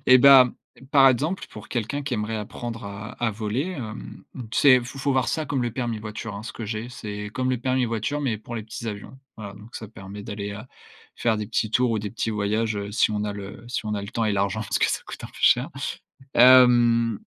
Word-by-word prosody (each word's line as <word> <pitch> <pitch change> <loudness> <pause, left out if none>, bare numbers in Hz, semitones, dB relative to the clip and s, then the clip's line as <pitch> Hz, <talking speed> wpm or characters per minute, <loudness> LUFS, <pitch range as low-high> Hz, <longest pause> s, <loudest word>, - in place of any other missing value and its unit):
et 130 0 +8
bah, 130 -1 +8 0.4
par 135 -3 +7
exemple, 150 +9 0
pour 105 0 -11
quelqu'un 125 +4 -2
qui 140 -1 -4
aimerait 110 0 -2
apprendre 115 +2 -6
à 100 +3 -7
à 120 -2 +1
voler, 110 +4 -2
hem, 115 -10 -7 0.3
tu - - -1
sais, 130 -3 +7
faut 130 +3 -9
faut 140 +1 0
voir 130 -1 +2
ça 155 -1 -1
comme 135 -2 -1
le 120 - -1
permis 120 -3 -2
voiture, 105 0 -6
hein, 100 - -7
ce 115 - -7
que 115 - -6
j'ai, 110 +3 -4
c'est 105 -3 -6
comme 130 +2 -1
le 130 - +1
permis 130 +1 +1
voiture, 115 +6 -2
mais 130 -6 0
pour 110 +3 -9
les 110 - -3
petits 110 +2 -8
avions. 105 +4 -7 0.2
Voilà, 100 -2 -7
donc 105 +3 -14
ça 110 - -7
permet 100 -1 -9
d'aller, 100 -1 -5
heu, 100 - -7 0.6
faire 110 -2 +1
des 105 - -3
petits 110 -1 -1
tours 125 +2 +2
ou 110 - 0
des 105 -1 -4
petits 115 - -3
voyages, 105 +1 0
heu, 100 0 -5
si 110 - +3
on 105 0 -1
a 105 - -2
le 100 +3 -9
si 120 -2 -4
on 105 - -1
a 100 - -3
le 100 - -7
temps 115 0 -1
et 105 - +1
l'argent 100 +1 0
parce 110 - -1
que - - +2
ça - - -1
coûte - - -8
un - - -7
peu - - -20
cher. - - +4 0.7
Hem 120 -3 +6
115 Hz, 245 wpm, -24 LUFS, 105-125 Hz, 0.7 s, et